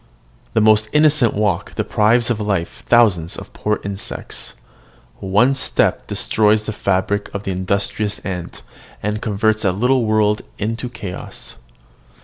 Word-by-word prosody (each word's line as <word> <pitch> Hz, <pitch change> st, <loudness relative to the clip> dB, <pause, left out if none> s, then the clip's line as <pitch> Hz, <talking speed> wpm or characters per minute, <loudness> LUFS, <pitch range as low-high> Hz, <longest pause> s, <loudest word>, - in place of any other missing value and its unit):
The 110 Hz, -, +3 dB
most 110 Hz, 0 st, +4 dB
innocent 150 Hz, -5 st, +4 dB
walk 105 Hz, -4 st, -1 dB
deprives 115 Hz, +3 st, +2 dB
of 115 Hz, -, -1 dB
life 100 Hz, -5 st, -2 dB
thousands 100 Hz, -9 st, +3 dB
of -, -, -10 dB
poor 105 Hz, 0 st, -1 dB
insects: 100 Hz, -1 st, -6 dB, 0.6 s
one 105 Hz, +8 st, +3 dB
step 135 Hz, -, 0 dB
destroys 110 Hz, 0 st, +2 dB
the 110 Hz, -, -3 dB
fabric 100 Hz, +1 st, 0 dB
of 100 Hz, -, -3 dB
the 95 Hz, -, -2 dB
industrious 100 Hz, +3 st, -1 dB
ant, 90 Hz, -3 st, -5 dB, 0.4 s
and 105 Hz, +1 st, -2 dB
converts 110 Hz, +1 st, +1 dB
a 95 Hz, -, +3 dB
little 125 Hz, +5 st, +2 dB
world 110 Hz, -1 st, +2 dB, 0.2 s
into 115 Hz, +4 st, -3 dB
chaos. 100 Hz, -7 st, -7 dB
105 Hz, 130 wpm, -19 LUFS, 100-110 Hz, 0.6 s, most